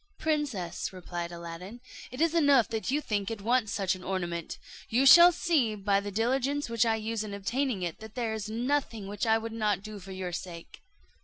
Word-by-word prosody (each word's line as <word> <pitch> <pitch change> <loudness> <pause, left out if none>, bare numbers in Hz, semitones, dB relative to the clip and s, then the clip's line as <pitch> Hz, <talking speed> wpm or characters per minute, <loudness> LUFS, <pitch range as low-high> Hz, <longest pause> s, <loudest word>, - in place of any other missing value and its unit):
"Princess," 285 - -2
replied 175 -2 -6
Aladdin, 170 +6 -8 0.3
"it 255 +4 -6
is 330 0 +3
enough 285 -8 +4
that 225 +1 -3
you 290 +3 +1
think 205 -7 -2
it 225 -2 -5
wants 225 0 +1
such 195 -3 0
an 185 -1 -9
ornament; 175 -3 -3 0.3
you 250 +4 +2
shall 345 +6 +10
see 290 -10 +1
by 200 -1 +1
the 200 0 -5
diligence 260 +6 0
which 230 0 +2
I 225 - +2
use 220 0 -3
in 205 -2 -6
obtaining 230 +1 -1
it, 170 -2 -4
that 220 -1 -11
there 230 -3 -1
is 215 -1 -4
nothing 235 -2 -1
which 205 +4 -3
I 220 0 +5
would 225 0 -6
not 210 -4 0
do 215 -1 -8
for 190 0 -11
your 185 -1 -4
sake." 170 -1 -8
220 Hz, 205 wpm, -29 LUFS, 195-250 Hz, 0.3 s, shall